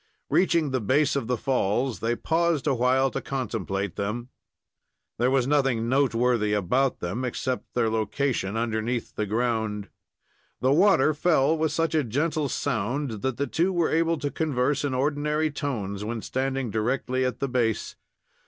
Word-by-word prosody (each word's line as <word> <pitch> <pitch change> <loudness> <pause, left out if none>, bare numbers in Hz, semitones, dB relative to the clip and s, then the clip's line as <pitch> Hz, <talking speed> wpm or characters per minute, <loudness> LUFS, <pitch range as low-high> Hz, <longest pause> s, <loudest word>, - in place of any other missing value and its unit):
Reaching 170 -6 +3
the 130 -1 0
base 140 +7 +2
of 135 -5 -1
the 125 -1 0
falls, 125 0 0
they 115 +1 0
paused 165 +1 0
a 145 - +2
while 130 +2 +2
to - - -3
contemplate 100 -7 -3
them. 115 +5 -3 0.9
There 125 +2 +3
was 130 -2 +2
nothing 135 -5 +1
noteworthy 120 -4 +2
about 125 +7 +1
them, 95 +9 -3
except 125 0 -3
their 120 -2 +2
location 110 -1 -1
underneath 115 +1 -2
the 105 - -2
ground. 110 -2 -1 0.7
The 130 +1 +2
water 155 -2 +4
fell 155 -1 +3
with 160 -1 0
such 165 -1 0
a 155 -2 +2
gentle 145 +4 -1
sound 120 -2 -2
that 130 -2 -1
the 140 - 0
two 170 +6 +1
were 175 -3 +1
able 165 +1 +2
to 145 -1 -3
converse 140 -2 0
in 140 -3 -1
ordinary 150 +3 0
tones 105 -9 -3
when 110 +1 -4
standing 130 -2 -2
directly 125 +4 0
at 125 -1 -2
the 140 - 0
base. 120 -4 -1
130 Hz, 160 wpm, -26 LUFS, 115-145 Hz, 0.9 s, water